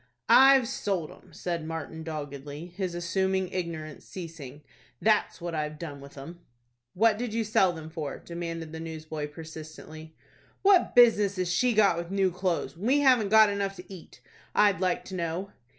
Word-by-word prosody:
"I've 270 -2 +7
sold 195 - -2
'em," 185 - -17
said 170 0 -4
Martin, 160 0 -6
doggedly, 145 -1 -6
his 185 -3 -3
assumed 190 +2 0
ignorance 160 -4 -5
ceasing. 160 -6 -9 0.4
"That's 215 -1 +2
what 170 -1 -5
I've 150 -1 -3
done 145 -4 -7
with 140 +1 -13
'em." 165 +6 -9 0.6
"What 220 +2 +3
did 240 -2 -3
you 230 - +1
sell 200 -4 +3
them 160 -2 -8
for?" 155 -4 -5
demanded 165 -2 -6
the 160 - -7
newsboy, 155 -2 -5
persistently. 155 0 -10 0.5
"What 390 -2 +4
business 210 -5 +5
has 180 -1 -1
she 245 +6 +2
got 200 -5 +4
with 170 0 -5
new 195 -1 +1
clothes, 180 -1 -2
when 190 +7 -4
we 285 +3 +4
haven't 250 -7 +4
got 220 0 +7
enough 200 -1 -2
to 180 +1 -11
eat, 180 - -13 0.3
I'd 200 -4 +4
like 185 -1 0
to 190 - -7
know?" 175 +3 -3
175 Hz, 170 wpm, -28 LUFS, 160-200 Hz, 0.6 s, I've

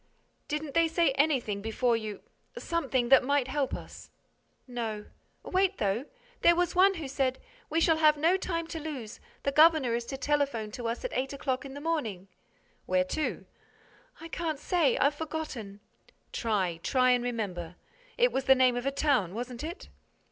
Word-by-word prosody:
"Didn't 300 -1 -3
they 335 0 +4
say 330 -2 +2
anything 265 -8 +1
before 230 +3 +1
you—something 255 - -3
that 270 -1 +7
might 280 0 +1
help 275 0 -1
us?" - - -10 0.6
"No—wait, 245 - -3
though: 205 +6 0 0.4
there 340 - +6
was 355 0 +1
one 385 +2 +5
who 320 -5 -5
said, 265 -1 0 0.3
'We 325 +2 +1
shall 325 -1 +4
have 305 -1 +5
no 330 +5 +3
time 335 -3 -2
to 325 - -4
lose—the 280 -2 -6
governor 305 -4 +5
is 235 0 -1
to 270 - -4
telephone 275 -7 0
to 235 +1 -5
us 230 - -3
at - - -4
eight 265 +2 -2
o'clock 270 -1 -2
in 270 0 -8
the 285 - -7
morning—'" 225 - -2 0.6
"Where 185 0 +3
to?" 310 - -2 0.7
"I 330 - -8
can't 325 -3 -2
say.—I've 295 -3 +2
forgotten—" 290 -10 -6 0.5
"Try—try 215 +4 +1
and 245 -1 +2
remember. 190 -8 -4 0.4
It - - +4
was 265 - -2
the 265 - +7
name 255 -1 +4
of 245 +2 -2
a - - +2
town, 265 - +1
wasn't 245 +2 -5
it?" 335 +5 -6
270 Hz, 160 wpm, -29 LUFS, 235-315 Hz, 0.7 s, that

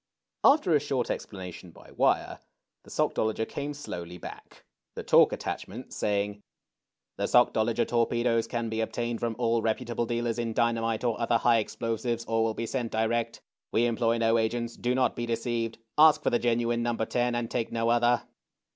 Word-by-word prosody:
After 275 - +5
a 150 - +5
short 135 -4 -1
explanation 90 -2 -7
by - - -16
wire, - - +1 0.4
the - - -17
Sockdolager 110 0 0
came 145 +1 -4
slowly 90 -10 -7
back, - - -11 0.3
the - - -5
talk - - +5
attachment 115 +7 -6
saying: 105 0 -1 0.8
The - - -1
Sockdolager - - +3
torpedoes 115 -1 +1
can 120 0 -2
be 110 0 -2
obtained 120 +1 -2
from 115 -1 -2
all 115 -1 +1
reputable 115 +1 -1
dealers 120 0 -1
in 115 -1 -2
dynamite 115 -1 0
or 120 -1 -1
other 115 0 +3
high 115 0 +3
ex 105 - -5
plosives, 115 0 -2
or 115 0 +1
will 110 -1 -1
be 115 - -3
sent 120 -1 -3
direct. 115 +1 -1 0.3
We 115 - +3
employ 115 0 +1
no 115 0 +3
agents. 115 +1 -2
Do 125 +1 -1
not 130 0 +1
be 120 0 -3
deceived. 115 -1 -2 0.2
Ask 155 -1 +7
for - - +1
the 120 - +2
genuine 120 0 +1
No. 120 0 0
10, 120 +2 0
and 120 -1 -3
take 115 -2 -2
no 115 0 0
other." 120 +1 +3
115 Hz, 175 wpm, -28 LUFS, 115-120 Hz, 0.8 s, Ask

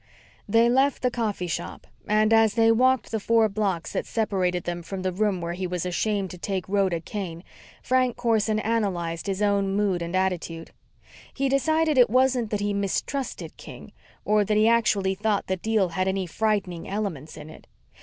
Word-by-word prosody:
They 230 +3 +4
left 265 +2 +2
the 250 - +2
coffee 215 -6 -2
shop 170 0 -5 0.2
and, 215 +1 +3
as 225 -1 +4
they 225 -1 +5
walked 255 +2 +2
the 220 - -1
four 225 +1 +3
blocks 195 -5 -2
that - - -2
separated 185 -5 -1
them 175 0 -4
from 185 +2 -6
the 185 - 0
room 195 -1 0
where 170 0 -3
he 185 +1 -3
was 180 -1 -3
ashamed 195 +1 -1
to 180 - -10
take 190 0 -3
Rhoda 190 -3 +1
Kane, 170 -2 -6 0.4
Frank 255 -1 +1
Corson 220 -3 +1
analyzed 190 -7 -2
his 195 +1 -1
own 200 -1 +1
mood 200 -4 +1
and 170 +2 -4
attitude. 175 -3 -2 0.6
He 275 0 0
decided 315 +1 +2
it 245 - +6
wasn't 255 -1 +2
that 210 -1 -2
he 205 0 0
mistrusted 200 +7 -3
King, - - -11 0.3
or 210 0 +3
that 210 +1 0
he 215 +1 +4
actually 210 -4 +2
thought 205 +1 -1
the 190 - -2
deal 215 -1 +1
had 185 +3 -1
any 190 0 -1
frightening 195 -2 -2
elements 190 -8 -4
in 155 0 -10
it. - - -15
205 Hz, 185 wpm, -25 LUFS, 185-225 Hz, 0.6 s, it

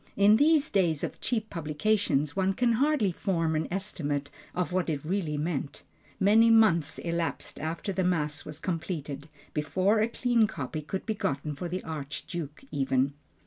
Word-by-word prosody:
In 205 +2 +6
these 310 +2 +4
days 170 -7 +2
of - - -4
cheap 220 -3 -1
publications, 155 -2 0
one 190 0 +1
can 240 +2 +2
hardly 260 -4 +2
form 165 -3 0
an 155 - 0
estimate 145 -7 -2 0.2
of 180 0 -1
what 180 -1 0
it 150 -2 -2
really 165 -4 -1
meant. 145 -2 -3 0.4
Many 220 +4 +6
months 170 -9 +4
elapsed 170 -1 -3
after 165 +5 -3
the 190 0 0
Mass 150 -5 0
was 155 0 -8
completed, 155 -5 -4 0.2
before 185 +8 +2
a 220 - +3
clean 235 -1 +2
copy 155 -1 -5
could 190 +6 -5
be 220 - 0
gotten 150 -6 -2
for 175 +5 -5
the 185 +2 -3
Archduke 155 - -6
even. 135 0 +1
170 Hz, 160 wpm, -28 LUFS, 150-205 Hz, 0.4 s, In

